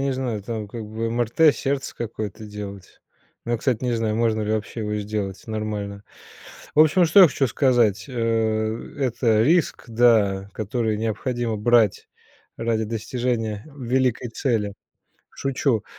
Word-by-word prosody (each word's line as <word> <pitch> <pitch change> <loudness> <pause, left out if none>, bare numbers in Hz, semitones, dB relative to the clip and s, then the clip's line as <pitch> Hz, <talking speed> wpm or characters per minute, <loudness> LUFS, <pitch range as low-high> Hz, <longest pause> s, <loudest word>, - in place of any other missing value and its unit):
не 135 0 0
знаю, 125 -5 -3
там 110 0 -5
как 115 +1 -6
бы 110 +2 -3
МРТ 120 +7 +3
сердца 135 0 -2
какое-то 110 -2 -5
делать. 100 -2 -9 0.4
Но 120 - -2
я, 120 - +1
кстати, 125 0 0
не 125 -1 0
знаю, 110 -2 0
можно 110 -1 +1
ли 105 +1 -1
вообще 110 +1 -3
его 105 -1 -2
сделать 100 -2 -4
нормально. 105 -2 -4 0.7
В 150 - +5
общем, 160 +4 +5
что 170 +5 +6
я - - +10
хочу 135 -1 0
сказать: 120 -6 +2
э, - - -9 0.9
это 120 -4 +2
риск, 165 +5 +2
да, 110 -4 +3
который 110 +1 -1
необходимо 115 +1 -2
брать 110 -1 +2 0.5
ради 115 -1 0
достижения 115 -1 -2
в 140 -2 -12
великой 125 0 +1
цели. 115 -5 -1 0.6
Шучу. 135 -4 -1
115 Hz, 145 wpm, -23 LUFS, 105-125 Hz, 0.9 s, я